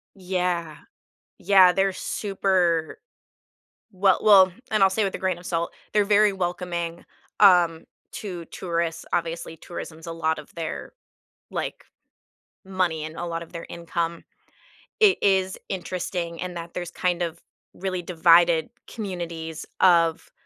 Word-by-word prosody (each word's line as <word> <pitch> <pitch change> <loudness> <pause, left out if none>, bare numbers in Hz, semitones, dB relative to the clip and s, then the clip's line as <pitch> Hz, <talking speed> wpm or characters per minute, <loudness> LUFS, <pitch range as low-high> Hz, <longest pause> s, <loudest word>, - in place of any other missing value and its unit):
Yeah. 180 -4 -2 0.6
Yeah, 190 -1 +6
they're 195 0 +1
super 185 -6 0 1.0
well 190 0 +3
well 190 -3 +7 0.2
and 215 -2 +4
I'll 190 - +6
say 210 +3 0
with 195 - -2
a - - -3
grain 185 -2 -1
of 175 - -14
salt, 170 -1 -1 0.2
they're 210 - +4
very 210 0 +4
welcoming, 175 -2 -3 0.3
um, 175 -5 +5 0.3
to 180 -5 -6
tourists, 170 -1 -3
obviously, 165 -1 -2
tourism's 165 -1 -9
a 165 - -4
lot 160 -1 -1
of 150 - -13
their, 165 -2 -5 0.6
like, - - -5 0.8
money 185 -5 -1
and 155 +1 -7
a 175 - -4
lot 170 0 -3
of 170 - -13
their 170 -1 -7
income. 170 0 -4 0.8
It 415 -3 +6
is 190 -1 +2
interesting 175 -2 -4
in 180 0 -4
that 170 0 -7
there's 175 -1 -5
kind 180 -1 -1
of 170 -1 -3 0.3
really 185 -1 -3
divided 170 -1 +4 0.2
communities 170 -6 -5
of, 165 -3 +3
175 Hz, 135 wpm, -24 LUFS, 165-190 Hz, 1.0 s, well